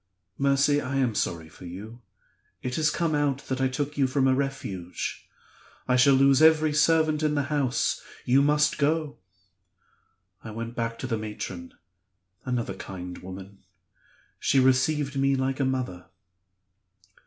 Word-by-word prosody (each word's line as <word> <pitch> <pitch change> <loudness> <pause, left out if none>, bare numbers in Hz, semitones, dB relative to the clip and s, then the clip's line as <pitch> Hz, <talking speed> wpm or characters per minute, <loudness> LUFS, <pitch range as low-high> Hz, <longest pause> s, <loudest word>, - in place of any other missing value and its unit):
'Mercy, 140 +1 +3
I 140 0 -4
am 130 -4 +1
sorry 85 -5 -2
for 85 - -14
you; 105 +7 -9 0.6
it 125 - -3
has 155 0 +3
come 165 +1 -1
out 145 -2 0
that 130 0 -1
I 130 - +3
took 145 +3 -3
you 135 - +4
from 135 0 +1
a 130 - +4
Refuge; 130 -10 -4 0.6
I 125 - +3
shall 135 +2 +6
lose 135 +1 +5
every 155 -1 +5
servant 155 0 +3
in 150 -1 +1
the 145 +1 -1
house; 135 -4 0 0.2
you 130 +3 +4
must 150 +1 +2
go.' 155 0 0 1.2
I 110 - -7
went 115 +2 -6
back 115 -1 -3
to - - -3
the 115 -4 -2
matron 95 -5 -7 0.7
another 120 -6 -2
kind 90 -1 -8
woman. 95 +2 -10 0.8
She 135 - +2
received 135 +2 +2
me 135 0 +3
like 130 0 -1
a 135 - +2
mother. 125 -9 -3
135 Hz, 150 wpm, -26 LUFS, 115-145 Hz, 1.2 s, shall